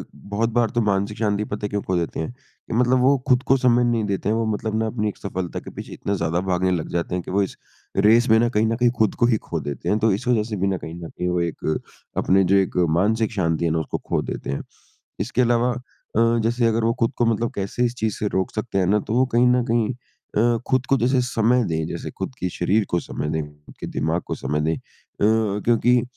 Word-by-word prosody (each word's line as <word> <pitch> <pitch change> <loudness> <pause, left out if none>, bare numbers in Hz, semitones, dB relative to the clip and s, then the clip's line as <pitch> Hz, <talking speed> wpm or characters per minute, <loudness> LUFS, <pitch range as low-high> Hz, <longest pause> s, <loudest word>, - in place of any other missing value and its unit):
बहुत 105 +3 -2
बार 120 -1 +2
तो 120 - +3
मानसिक 100 0 0
शांति 105 -1 0
पता 105 0 -4
है - - -2
क्यों 100 0 -2
खो 95 - -2
देते 85 -1 -2
हैं? 80 - -3
कि 125 -1 -13
मतलब 125 +2 +3
वो 135 +2 +5
खुद 125 -1 +4
को 135 - +5
समय 125 -1 +3
नहीं 120 -2 +1
देते 100 0 -1
हैं। 110 - +2
वो 115 0 0
मतलब 110 +1 -3
ना 110 - 0
अपनी 110 -1 -1
एक - - -8
सफलता 95 -3 -4
के - - -10
पीछे - - -8
इतना 100 - -3
ज़्यादा 85 -1 0
भागने 95 0 +1
लग 85 -4 -1
जाते 85 +1 -1
हैं 90 - -1
कि - - -7
वो 100 +2 +2
इस 95 - -5 0.4
रेस 110 +5 +5
में 110 - +6
न 120 +1 +3
कहीं 110 -2 +2
न 115 - 0
कहीं 120 +1 +3
खुद 110 -2 +2
को - - +2
ही 120 -2 +3
खो 85 -5 -4
देते 70 -3 -4
हैं, 105 - +2
तो 110 +1 +3
इस 100 - -4
वज़ह 120 -4 +3
से 110 - -2
बिना 95 0 0
कहीं 80 - -8
न 80 - -6
कहीं 90 - -4
वो 90 0 0
एक 80 -2 -2 0.4
अपने 95 +1 +3
जो 95 +2 +3
एक 95 -2 +1
मानसिक 105 +7 +2
शांति 85 -5 0
है 85 - +1
ना, 80 - +1
उसको 80 - -3
खो - - -2
देते - - -5
हैं। 70 - -2 0.6
इसके - - -1
अलावा 120 +1 +2 0.4
अ, 115 +1 +4
जैसे 120 +1 +1
अगर 115 0 +1
वो 115 - +3
खुद 115 +1 +2
को 120 - +2
मतलब 115 +1 +1
कैसे 100 +5 -1
इस 120 - -3
चीज़ 110 -3 -1
से 105 - -1
रोक 95 -2 -1
सकते 110 -2 -2
हैं 95 - +2
ना, 105 +4 +3
तो 110 - -4
वो 130 +2 +4
कहीं 120 +1 +5
न 125 0 +3
कहीं 115 0 +1 0.4
अ, 115 +2 +3
खुद 130 0 +1
को 135 - +3
जैसे 130 +2 +2
समय 120 0 +2
दें, 80 -4 -1
जैसे 85 - -5
खुद 95 +6 -5
कि 90 - -1
शरीर 100 +6 +1
को 85 - +2
समय 75 - -4
दें, 80 0 -1 0.2
खुद - - -15
के - - -4
दिमाग - - -1
को - - -2
समय 75 +1 -2
दें 80 +2 +1
अ, - - -7 0.9
क्योंकि 120 +1 +3
110 Hz, 260 wpm, -23 LUFS, 95-120 Hz, 0.9 s, में